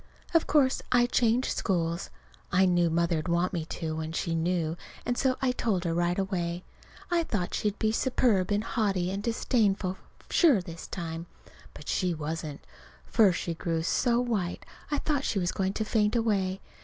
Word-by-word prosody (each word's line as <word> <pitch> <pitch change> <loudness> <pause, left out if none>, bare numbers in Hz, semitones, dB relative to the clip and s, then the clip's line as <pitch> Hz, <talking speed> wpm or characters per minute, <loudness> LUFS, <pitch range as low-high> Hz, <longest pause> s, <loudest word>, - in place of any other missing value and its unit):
Of 330 - +3
course 275 -3 +3
I 245 -1 +5
changed 245 0 +2
schools. 170 -3 -1 0.4
I 185 +1 +4
knew 175 -2 +3
Mother'd 165 -1 0
want 170 +2 +1
me 165 -3 -2
to, 160 -1 -4
when 160 0 -4
she 165 0 -1
knew, 165 -1 0 0.3
and 245 - 0
so 260 0 +2
I 255 - +3
told 215 -7 0
her 170 -2 0
right 175 +1 +1
away. 180 -3 -2 0.5
I 345 -1 +3
thought 205 - -2
she'd 210 0 -1
be 220 -1 +1
superb 225 -5 +2
and 205 +1 +1
haughty 195 -6 0
and 195 +1 -3
disdainful 205 -4 +1 0.3
sure 300 - +5
this 170 -2 -8
time. 165 -1 -5 0.5
But - - -11
she 180 -3 0
wasn't. 155 -1 -5 0.4
First 200 -6 +4
she 170 - -3
grew 165 0 -2
so 235 +7 +2
white 215 -8 -2 0.2
I 290 - 0
thought 285 -3 0
she 215 - -1
was 180 -2 +1
going 190 0 -1
to 215 - -2
faint 210 0 +1
away. 200 -5 +1
190 Hz, 175 wpm, -28 LUFS, 170-225 Hz, 0.5 s, I